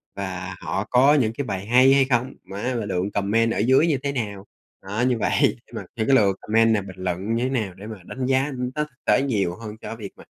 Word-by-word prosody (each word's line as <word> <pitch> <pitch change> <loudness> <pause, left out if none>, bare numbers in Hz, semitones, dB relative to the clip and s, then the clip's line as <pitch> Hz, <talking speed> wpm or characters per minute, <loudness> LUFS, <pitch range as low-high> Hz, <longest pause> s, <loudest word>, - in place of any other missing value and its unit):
Và 95 -1 -5
họ 85 +3 -2
có 130 +4 +5
những 120 -7 +2
cái 140 +4 -4
bài 95 -4 -4
hay 130 +4 +6
hay 135 -1 +4
không? 130 0 0
Má 105 +6 -4
mà 110 - -3
lượng 95 0 -2
comment 110 +3 +1
ở - - -2
dưới 130 +9 +4
như 150 -4 +2
thế 140 - 0
nào? 105 -7 -4 0.4
Đó, 100 +4 -3
như 125 -2 +1
vậy, 110 - 0 0.3
đúng - - -14
rồi, - - -5
thêm 110 - -1
cái 135 - +5
lượt 100 -6 +3
comment 115 +1 +3
này 105 - +1
bình 95 -1 -10
luận 95 +5 -2
như 120 - 0
thế 130 - 0
nào 110 -8 -2
để 100 +3 -11
mà 110 -5 -9
đánh 130 0 -4
giá, 130 +1 +2
ưm, 125 -3 -3
nó 150 - +1
thực 145 -4 -15
tế - - +4
nhiều 100 -10 0
hơn 110 +1 -8
cho - - -6
việc 105 -4 -8
mà, - - -14
115 Hz, 265 wpm, -23 LUFS, 100-130 Hz, 0.4 s, hay